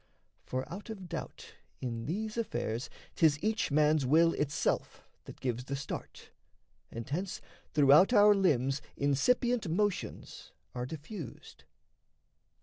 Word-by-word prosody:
For 130 +1 -4
out 205 +5 -8
of 195 -5 -7
doubt 165 -2 -7 0.3
In 115 -2 -4
these 215 +6 -3
affairs 125 - -2 0.2
'tis 155 -3 +4
each 215 +1 0
man's 150 0 +3
will 165 +6 +4
itself 150 0 -1 0.2
That - - -11
gives 125 -1 -2
the 140 - -3
start, 140 - -7 0.6
and 115 0 -7
hence 180 +7 -3 0.3
throughout 150 - +6
our 210 -2 +7
limbs 140 -9 +2 0.2
Incipient 225 - +2
motions 205 +3 -2 0.2
are 125 0 -4
diffused. 155 - -9
155 Hz, 120 wpm, -31 LUFS, 135-200 Hz, 0.6 s, our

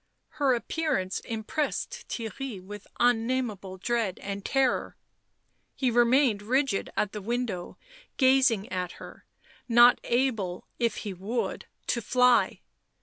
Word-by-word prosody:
Her 270 -3 +4
appearance 235 - -1
impressed 235 +7 -3
Theirry 230 0 -5
with 205 +2 -10
unnameable 230 -5 0
dread 225 -1 -1
and 200 0 -5
terror; 270 +1 0 0.8
he 255 -3 +1
remained 240 -2 +4
rigid 250 0 0
at 210 - +1
the 210 - -6
window 225 -4 -3 0.4
gazing 260 -6 +4
at 180 -1 -3
her, - - -12 0.4
not 240 +1 +7
able, 225 -8 0
if 235 -1 +1
he 200 - -3
would, 200 +7 -3 0.2
to 235 - 0
fly. 250 +2 +3
235 Hz, 115 wpm, -28 LUFS, 200-255 Hz, 0.8 s, not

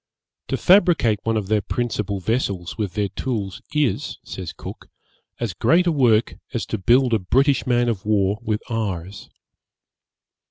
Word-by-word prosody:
'To - - -1
fabricate 175 - +4
one 115 0 0
of 105 - -2
their 105 +1 +1
principal 105 -3 -2
vessels 100 -4 -2
with 105 -4 -3
their 105 -2 0
tools 105 -7 -4
is,' 150 -4 0
says - - -6
Cook, - - -10 0.5
'as - - -2
great 175 +2 +3
a 175 - +3
work 120 -7 +2 0.2
as 115 - -1
to 110 - -3
build 125 +5 +3
a 110 - +3
British 135 +9 +2
man 120 -1 +2
of 110 -5 -1
war 105 -1 +1
with 110 -2 -2
ours.' 100 -4 -4
110 Hz, 155 wpm, -22 LUFS, 100-125 Hz, 0.5 s, fabricate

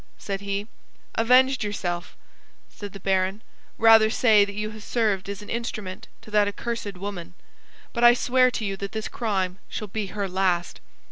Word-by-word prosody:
said 195 -1 -4
he. 200 +1 -3 0.5
"Avenged 255 +3 +4
yourself," 175 -4 -4 0.6
said 205 -1 -8
the 200 - -10
baron. 190 +2 0 0.3
"Rather 225 -1 +7
say 220 -3 +5
that 200 0 -5
you 215 +1 -3
have 215 0 -10
served 205 -4 0
as 200 0 -6
an - - -12
instrument 215 -5 -5 0.2
to 215 - -13
that 210 -1 +4
accursed 205 -2 -4
woman; 180 -3 -6 0.6
but 235 - -1
I 240 0 +8
swear 255 +1 +3
to 225 -3 -3
you 195 -1 -2
that 200 0 -6
this 220 -1 -3
crime 190 -5 -2
shall 210 -2 -5
be 210 +1 -3
her 200 0 -3
last." 180 -2 -1
205 Hz, 175 wpm, -25 LUFS, 195-225 Hz, 0.6 s, I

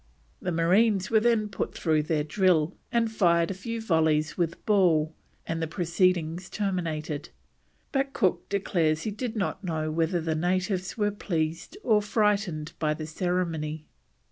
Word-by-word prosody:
The 180 - -2
marines 190 +5 +3
were 220 - +6
then 225 -1 +2
put 205 - -4
through 155 -2 +2
their 150 0 0
drill, 170 0 +2 0.2
and 230 -2 +1
fired 170 -4 +3
a - - -2
few 230 +5 -5
volleys 160 -6 +1
with 170 -2 -2
ball, 170 -7 +3 0.3
and 165 0 -3
the 160 - -1
proceedings 175 0 0
terminated; 165 -7 -3 0.6
but 270 0 0
Cook 185 -9 0
declares 165 -6 +1
he 215 - -2
did 225 +2 -4
not 205 0 -2
know 155 -3 -2
whether 165 +2 +1
the 160 -1 -1
natives 185 +4 -1
were 205 -1 +1
pleased 165 - -3
or 215 -3 +4
frightened 205 -7 0
by 155 -1 +1
the 155 0 -5
ceremony. 160 -2 -2
175 Hz, 150 wpm, -27 LUFS, 160-205 Hz, 0.6 s, were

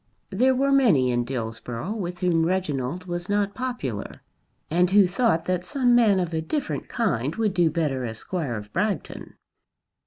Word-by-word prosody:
There 255 +7 +3
were 275 +2 +2
many 190 - +4
in 120 0 0
Dillsborough 120 - -4
with 180 -5 -5
whom 170 -3 +2
Reginald 170 -2 -1
was 175 0 -5
not 205 0 +1
popular; 240 - -5 0.5
and 175 +2 +3
who 200 0 +6
thought 180 -3 +1
that 180 -1 -1
some 245 +6 +1
man 220 -5 +5
of 175 -2 -2
a 160 - 0
different 280 - -3
kind 150 - -1
would 220 -3 0
do 175 -3 +3
better 150 -5 -1
as 110 -2 -4
Squire 155 -8 -3
of 105 -1 -8
Bragton. 210 +1 -3
180 Hz, 165 wpm, -25 LUFS, 135-210 Hz, 0.5 s, who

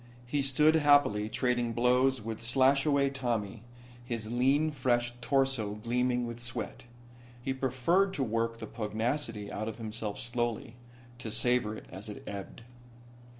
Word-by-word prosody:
He 140 +4 0
stood 145 +3 +4
happily 145 -8 +4
trading 120 -1 0
blows 125 +1 +2
with 115 0 -5
Slashaway 135 +3 +3
Tommy, 115 -6 -2 0.4
his 115 -2 -5
lean 135 +6 +2
fleshed 120 -3 0
torso 135 -5 +1
gleaming 125 +3 0
with 115 0 -6
sweat. 120 0 -4 0.5
He 130 +2 -2
preferred 135 +9 +1
to 135 - 0
work 115 0 -1
the 115 - -6
pugnacity 110 0 -3
out 110 +1 -3
of 110 - -5
himself 110 -2 -5
slowly, 120 -1 -2 0.4
to 115 - -5
savor 120 -1 +1
it - - -11
as 100 +4 -8
it 105 - -8
ebbed. 100 +3 -7
120 Hz, 140 wpm, -30 LUFS, 115-135 Hz, 0.5 s, stood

